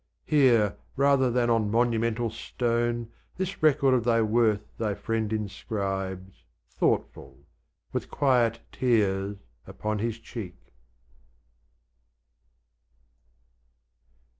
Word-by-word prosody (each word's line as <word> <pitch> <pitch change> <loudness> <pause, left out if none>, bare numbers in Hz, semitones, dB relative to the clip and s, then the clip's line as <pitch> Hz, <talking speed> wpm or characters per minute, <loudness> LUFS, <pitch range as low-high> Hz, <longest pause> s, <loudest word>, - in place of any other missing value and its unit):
Here, 120 - +3 0.2
rather 140 -1 +3
than 120 0 +1
on 110 -3 +2
monumental 115 0 +1
stone, 120 0 -2 0.3
This 190 +1 -4
record 140 -3 +4
of 125 -3 +2
thy 115 -1 +3
worth 110 -1 +2 0.2
thy 105 -3 -1
Friend 110 -1 -2
inscribes, 95 -3 -4 0.3
Thoughtful, 65 +2 -2 0.5
with - - -3
quiet 120 -5 +2
tears 100 -5 +1 0.3
upon 105 0 -3
his 115 +1 -2
cheek. 110 -5 -8
115 Hz, 90 wpm, -27 LUFS, 105-120 Hz, 0.5 s, record